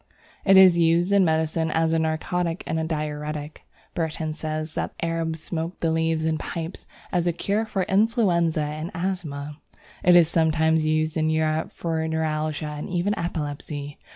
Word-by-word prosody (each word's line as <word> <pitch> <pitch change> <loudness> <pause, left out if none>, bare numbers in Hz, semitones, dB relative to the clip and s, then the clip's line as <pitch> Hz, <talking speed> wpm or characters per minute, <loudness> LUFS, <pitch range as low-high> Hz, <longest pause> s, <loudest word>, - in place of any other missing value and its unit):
It 195 -1 +6
is 185 -2 +8
used 170 +3 +3
in 200 -1 +5
medicine 160 0 +1
as 160 +1 +1
a 165 - +2
narcotic 165 +2 -1
and 160 - -1
diuretic. 150 -1 -4 0.3
Burton 160 -1 -2
says 155 0 -4
that - - -4
the - - -2
Arabs 165 -1 -2
smoke 165 +1 -4
the 165 - +1
leaves 160 0 0
in 160 -1 0
pipes 165 +1 -6 0.2
as 175 -2 +1
a - - +3
cure 205 +6 -1
for 195 -3 -1
influenza 190 -7 +2
and 155 +2 -4
asthma. 155 -5 -4 0.4
It 180 0 +6
is 170 -2 +7
sometimes 160 -1 +2
used 155 +1 +1
in 155 0 +1
Europe 155 0 0
for 160 -1 -2
neuralgia 155 -1 -1
and 150 0 -5
even 180 +3 0
epilepsy. 145 -3 -4
160 Hz, 160 wpm, -24 LUFS, 155-170 Hz, 0.4 s, is